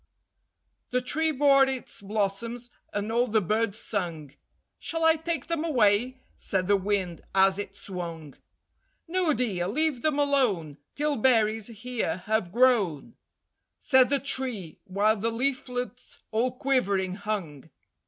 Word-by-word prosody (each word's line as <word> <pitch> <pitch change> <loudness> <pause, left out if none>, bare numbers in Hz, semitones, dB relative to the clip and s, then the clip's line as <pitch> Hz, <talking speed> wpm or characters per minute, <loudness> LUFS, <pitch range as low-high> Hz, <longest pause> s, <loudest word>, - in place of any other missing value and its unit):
The 250 - +1
tree 315 +6 +1
bore 275 -2 +5
its 265 -5 -5
blossoms, 220 +4 -2 0.2
and 205 +2 -3
all 240 +2 +2
the 220 -1 +2
birds 215 +2 0
sung: 165 -11 -3 0.5
"Shall 325 0 -3
I 320 0 +6
take 325 -3 -3
them 335 -1 -2
away?" 250 -3 +2
said 185 -2 -1
the 205 - +4
Wind, 190 -3 -1
as 195 0 +4
it 200 -1 -6
swung. 170 -7 -6 0.7
"No, 355 -1 +1
dear, 215 -9 -1
leave 290 +3 0
them 305 0 +1
alone 240 - +1 0.2
Till 295 0 0
berries 220 -3 +2
here 230 -6 -3
have 215 -5 0
grown," 230 - +2 0.6
Said 260 -2 +4
the 280 - +3
tree, 250 - -1
while 210 +3 +1
the 225 +3 -1
leaflets 250 0 -3
all 235 +3 +1
quivering 200 -8 0
hung. 190 -8 -5
225 Hz, 135 wpm, -27 LUFS, 195-260 Hz, 0.7 s, I